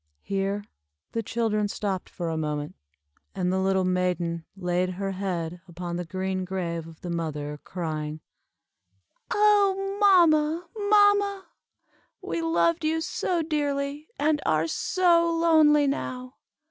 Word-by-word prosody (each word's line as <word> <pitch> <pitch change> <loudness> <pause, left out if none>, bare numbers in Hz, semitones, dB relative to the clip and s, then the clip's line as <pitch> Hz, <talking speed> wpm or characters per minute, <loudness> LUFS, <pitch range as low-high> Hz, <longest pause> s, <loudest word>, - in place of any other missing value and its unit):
Here 195 +1 -1 0.5
the 230 - -1
children 220 -2 0
stopped 200 -2 -3
for 170 -3 -4
a 160 - -2
moment, 150 -2 -3 0.6
and 180 -1 0
the 190 - +1
little 190 0 +2
maiden 180 -2 -1
laid 180 0 0
her 195 +1 -3
head 180 -3 -3
upon 175 0 -5
the 175 0 -3
green 185 +2 -2
grave 170 -3 -3
of 165 -1 -14
the 175 - -5
mother, 150 -3 -4
crying 155 -3 -4 1.1
"Oh, 400 -2 +3
mamma, 335 -4 +4
mamma! 410 -2 +3 0.7
We 335 - -3
loved 330 0 +1
you 315 +1 +1
so 335 +1 -1
dearly, 290 -1 -2
and 295 0 +1
are 155 +1 +2
so 335 - +2
lonely 315 -3 +5
now. 255 -2 -3
200 Hz, 125 wpm, -26 LUFS, -, 1.1 s, lonely